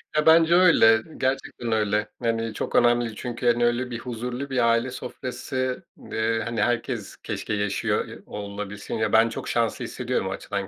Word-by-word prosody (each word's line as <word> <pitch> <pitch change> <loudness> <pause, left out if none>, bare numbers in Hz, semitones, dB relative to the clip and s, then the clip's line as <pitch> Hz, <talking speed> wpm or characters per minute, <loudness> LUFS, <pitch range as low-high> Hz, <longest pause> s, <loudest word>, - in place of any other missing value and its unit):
Ya, 150 0 +2
bence 165 +1 +6
öyle, 130 -12 +6 0.2
gerçekten 130 -3 -2
öyle, 105 -1 +1
yani, 115 -1 -1
çok - - -4
önemli 120 -2 +3
çünkü, 120 +1 -4
hani, 120 0 +4
öyle 120 +1 0
bir 115 - -4
huzurlu 125 +3 -5
bir 125 -3 +2
aile 120 +2 +1
sofrası, 130 +3 -4 0.3
eee, 110 0 0
hani, 115 -2 -2
herkes 120 -2 -1
keşke 110 - -4
yaşıyor, 100 -1 0
ya, - - -9
olabilsin, 100 0 -6
ya, 110 -1 -1
ben 115 +1 +6
çok 115 - -6
şanslı 115 -2 0
hissediyorum - - -2
o - - -3
açıdan 100 -1 -4
115 Hz, 170 wpm, -25 LUFS, 110-125 Hz, 0.3 s, bence